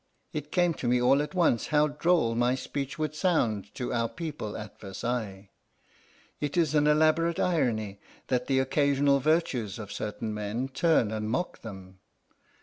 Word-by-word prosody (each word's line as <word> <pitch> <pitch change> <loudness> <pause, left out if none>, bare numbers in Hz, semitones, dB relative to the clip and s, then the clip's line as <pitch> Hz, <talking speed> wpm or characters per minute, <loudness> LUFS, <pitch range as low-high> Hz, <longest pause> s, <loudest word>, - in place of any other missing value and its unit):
It 150 -1 -5
came 175 -2 +2
to 125 - -1
me 125 +1 +3
all 130 +3 +4
at 150 +4 -5
once 165 -10 +2
how 150 0 +3
droll 150 -5 +2
my 120 +2 +2
speech 135 +2 -4
would 155 -1 -2
sound 115 - 0
to 125 - -3
our 115 -1 0
people 150 -11 -5
at 105 -1 -9
Versailles. 100 -1 -4 0.9
It 145 +3 -3
is 160 -4 +2
an 150 -1 +3
elaborate 155 +2 +3
irony 110 - 0 0.3
that 125 -1 -1
the 135 - +2
occasional 140 +1 +3
virtues 135 - 0
of 105 -3 -8
certain 110 +1 -4
men 105 +5 -3
turn 135 -5 +2
and 110 0 -3
mock 130 +10 -2
them. 95 -4 -10
130 Hz, 160 wpm, -28 LUFS, 110-150 Hz, 0.9 s, all